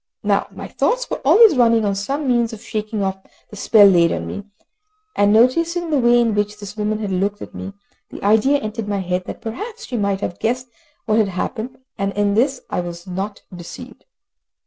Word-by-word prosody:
Now -, -, +1 dB
my -, -, -9 dB
thoughts -, -, 0 dB
were -, -, -3 dB
always 440 Hz, -7 st, +6 dB
running 230 Hz, -3 st, +4 dB
on 200 Hz, -, +1 dB
some 270 Hz, +9 st, -3 dB
means 240 Hz, -2 st, +1 dB
of 220 Hz, +1 st, -10 dB
shaking 215 Hz, -2 st, -3 dB
off 190 Hz, 0 st, -2 dB, 0.3 s
the -, -, -9 dB
spell 205 Hz, +1 st, +5 dB
laid 175 Hz, -4 st, +5 dB
on -, -, -3 dB
me, 205 Hz, -, -6 dB, 0.7 s
and 205 Hz, 0 st, +3 dB
noticing 330 Hz, +9 st, +2 dB
the 295 Hz, -, +3 dB
way 240 Hz, 0 st, +4 dB
in 230 Hz, -2 st, +2 dB
which 210 Hz, 0 st, -1 dB
this 205 Hz, 0 st, -9 dB
woman 215 Hz, 0 st, -1 dB
had 210 Hz, -2 st, -4 dB
looked 200 Hz, +2 st, -1 dB
at -, -, -9 dB
me, 195 Hz, -, -7 dB, 0.4 s
the -, -, -10 dB
idea 220 Hz, +8 st, +4 dB
entered 215 Hz, -3 st, -5 dB
my 200 Hz, -1 st, -1 dB
head 180 Hz, 0 st, -2 dB
that -, -, -8 dB
perhaps 425 Hz, -, -6 dB
she 245 Hz, -, -4 dB
might 200 Hz, -2 st, -1 dB
have 175 Hz, -, -4 dB
guessed 250 Hz, +2 st, -1 dB, 0.4 s
what 215 Hz, -1 st, +2 dB
had 210 Hz, -3 st, +2 dB
happened, 220 Hz, +6 st, -4 dB, 0.2 s
and 195 Hz, 0 st, -1 dB
in 205 Hz, 0 st, +1 dB
this 255 Hz, +5 st, +1 dB
I -, -, -2 dB
was 175 Hz, 0 st, -6 dB
not 195 Hz, +2 st, -5 dB
deceived. 175 Hz, -1 st, -10 dB
215 Hz, 205 wpm, -20 LUFS, 200-240 Hz, 0.7 s, always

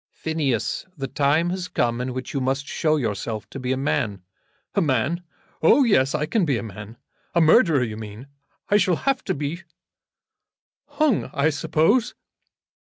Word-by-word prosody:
"Phineas, 150 Hz, -, -2 dB
the 135 Hz, -, -3 dB
time 150 Hz, +6 st, +1 dB
has 185 Hz, -1 st, -3 dB
come 120 Hz, -7 st, 0 dB
in 130 Hz, +1 st, -3 dB
which 130 Hz, 0 st, -6 dB
you 140 Hz, -, -1 dB
must 135 Hz, +2 st, -1 dB
show 155 Hz, -2 st, +1 dB
yourself 110 Hz, -4 st, -3 dB
to 135 Hz, -, -6 dB
be 125 Hz, 0 st, -2 dB
a 130 Hz, -, +1 dB
man." 105 Hz, -8 st, -1 dB, 0.5 s
"A -, -, +2 dB
man! 150 Hz, +4 st, +1 dB, 0.4 s
Oh, 270 Hz, -, +6 dB
yes, 145 Hz, -, +3 dB
I 150 Hz, 0 st, 0 dB
can 215 Hz, +5 st, +1 dB
be 140 Hz, -7 st, +1 dB
a -, -, -4 dB
man. 105 Hz, +1 st, -9 dB, 0.4 s
A -, -, +5 dB
murderer 160 Hz, -, +5 dB
you 110 Hz, -3 st, -4 dB
mean. 110 Hz, +2 st, -8 dB, 0.4 s
I 205 Hz, -, +4 dB
shall 180 Hz, -3 st, +3 dB
have 270 Hz, -1 st, +1 dB
to -, -, -1 dB
be 150 Hz, +5 st, -4 dB, 1.3 s
hung, 305 Hz, -8 st, +1 dB
I 145 Hz, +3 st, +3 dB
suppose." 160 Hz, -, +1 dB
145 Hz, 170 wpm, -23 LUFS, 125-170 Hz, 1.3 s, Oh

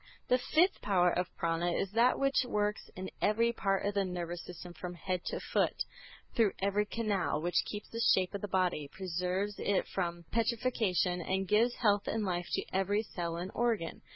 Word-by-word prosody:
The 250 Hz, -, +4 dB
fifth 320 Hz, +8 st, +2 dB
power 180 Hz, -3 st, +3 dB
of 180 Hz, +1 st, 0 dB
Prâna 170 Hz, 0 st, 0 dB
is 195 Hz, -, -2 dB
that 235 Hz, +3 st, +4 dB
which 275 Hz, -1 st, +2 dB
works 210 Hz, -3 st, -1 dB
in 185 Hz, +1 st, -6 dB
every 230 Hz, +2 st, +3 dB
part 195 Hz, -4 st, 0 dB
of 205 Hz, -, 0 dB
the 200 Hz, -1 st, +2 dB
nervous 175 Hz, -2 st, -4 dB
system 175 Hz, 0 st, -9 dB
from 180 Hz, +1 st, -6 dB
head 180 Hz, +1 st, -2 dB
to -, -, -2 dB
foot, -, -, 0 dB, 0.5 s
through 225 Hz, -5 st, +3 dB
every 200 Hz, +2 st, +1 dB
canal, 205 Hz, -9 st, 0 dB
which 175 Hz, +3 st, +1 dB
keeps 210 Hz, 0 st, -6 dB
the 230 Hz, -, -5 dB, 0.2 s
shape 185 Hz, 0 st, 0 dB
of 200 Hz, -, -4 dB
the 205 Hz, -, -3 dB
body, 180 Hz, -6 st, 0 dB
preserves 185 Hz, +2 st, -2 dB
it 200 Hz, -2 st, +1 dB
from 175 Hz, -2 st, -2 dB
putrefaction, 225 Hz, -7 st, +1 dB
and 190 Hz, +2 st, -1 dB
gives 230 Hz, +5 st, +3 dB
health 205 Hz, -4 st, +2 dB
and 220 Hz, -1 st, 0 dB
life 175 Hz, -2 st, -1 dB
to -, -, 0 dB
every 200 Hz, +3 st, +1 dB
cell 170 Hz, -5 st, -4 dB
and 180 Hz, +3 st, -4 dB
organ. 230 Hz, -8 st, 0 dB
195 Hz, 185 wpm, -32 LUFS, 180-215 Hz, 0.5 s, The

